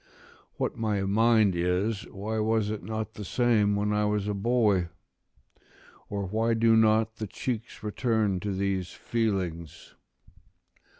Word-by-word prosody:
["What - - -2
my 105 -3 -1
mind 110 -1 +3
is, 95 +6 0
why 110 +3 -4
was 110 -1 +1
it 110 - -4
not 110 0 -4
the 105 - -7
same, 105 -1 +2
when 105 +1 0
I 105 0 +1
was 105 -1 0
a 105 - 0
boy? 100 -4 +2 1.2
or 100 -1 -3
why 110 +4 0
do 115 0 +4
not 110 0 +3
the 110 - -4
cheeks 115 +2 -5
return 110 -3 0
to 100 +2 -3
these 95 -2 -1
feelings?" 95 -9 -3
105 Hz, 135 wpm, -27 LUFS, 100-110 Hz, 1.2 s, do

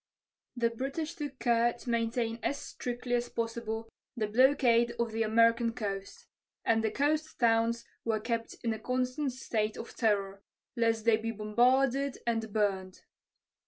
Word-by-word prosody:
The 235 -1 +2
British 275 +7 -3
took 290 -4 -6
care 235 -1 +2
to 240 - -9
maintain 230 0 0
as 285 - -1
strictly 245 -2 -5
as 240 0 +1
possible 230 -1 -3 0.3
the 220 - +1
blockade 235 0 +4
of 235 -1 -1
the 225 +1 -2
American 230 +1 +3
coast, 205 - -5 0.4
and 225 -1 +3
the 220 - +2
coast 300 +6 0
towns 230 0 +2 0.2
were 220 -2 0
kept 230 +1 -3
in 230 -1 +1
a 220 - -6
constant 255 +4 -1
state 220 -4 -2
of 235 - -8
terror 200 -3 0 0.3
lest 230 -2 +1
they 230 -2 +5
be 225 +1 -4
bombarded 250 +5 +2
and 225 -2 -1
burned. 195 -3 -1
230 Hz, 150 wpm, -31 LUFS, 220-250 Hz, 0.4 s, they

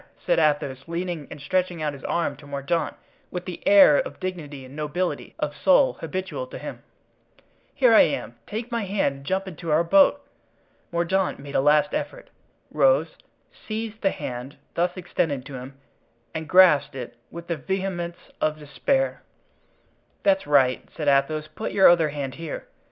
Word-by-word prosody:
said - - +3
Athos, 145 -4 0
leaning 170 -3 -4
and - - -9
stretching 180 +3 -1
out 150 -1 -1
his 140 - -11
arm 170 -1 0
to 145 - -14
Mordaunt 140 +4 -2 0.3
with 180 0 -5
that 180 -2 -6
air 195 -8 +8
of 145 - -4
dignity 150 -7 -6
and 130 +2 -12
nobility 155 +4 -3
of - - -3
soul - - +4
habitual 185 -9 -4
to - - -8
him; - - -8 0.9
"here - - +5
I - - +9
am, - - 0
take 225 +3 -5
my 230 -3 -1
hand 190 -8 0
and 140 - -14
jump 190 +1 -1
into 170 -2 -7
our 155 +3 +4
boat." 285 - +4 0.7
Mordaunt 175 +3 0
made 140 0 -10
a - - +3
last 150 +1 +3
effort—rose—seized 230 - -3
the 195 - +3
hand 125 -2 -6 0.2
thus 175 +2 0
extended 155 -6 -2
to 140 - -10
him 130 +1 -8 0.6
and 160 -1 -5
grasped 180 -7 +6
it 125 -2 -7
with 170 0 -9
the 170 - -2
vehemence 175 +2 -3 0.2
of 155 0 +1
despair. 265 - -1 1.0
"That's 195 -5 +2
right," 135 -3 +3
said 150 - -3
Athos; 150 +3 +2
"put 155 +8 -6
your 195 -1 +7
other 165 -3 +5
hand 140 -3 -4
here." 165 -2 -6
165 Hz, 160 wpm, -24 LUFS, 145-190 Hz, 1.0 s, I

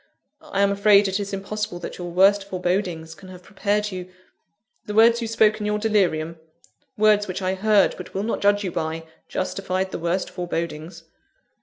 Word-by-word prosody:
I 200 - -2
am 200 0 +3
afraid 200 0 +5
it 190 +1 -1
is 200 -1 -4
impossible 200 0 -4
that - - -7
your 175 -1 -5
worst 195 +3 +4
forebodings 180 -3 -2
can 185 +2 -14
have 180 -1 -12
prepared 210 +1 -1
you 185 -1 -7 0.4
" 215 +3 -50
"The 210 - -4
words 230 +2 +5
you 230 - -2
spoke 220 -1 +3
in 210 - -3
your 210 0 0
delirium 175 -7 0 0.6
words 210 -1 +4
which 185 +1 -4
I 185 0 0
heard, 205 +1 +3
but - - -10
will 195 - -1
not 225 - -2
judge 205 0 +3
you 185 - -3
by 165 -1 -3 0.2
justified 190 0 -2
the - - -4
worst 170 +3 -1
forebodings." 170 -2 -5
195 Hz, 185 wpm, -23 LUFS, 180-210 Hz, 0.6 s, afraid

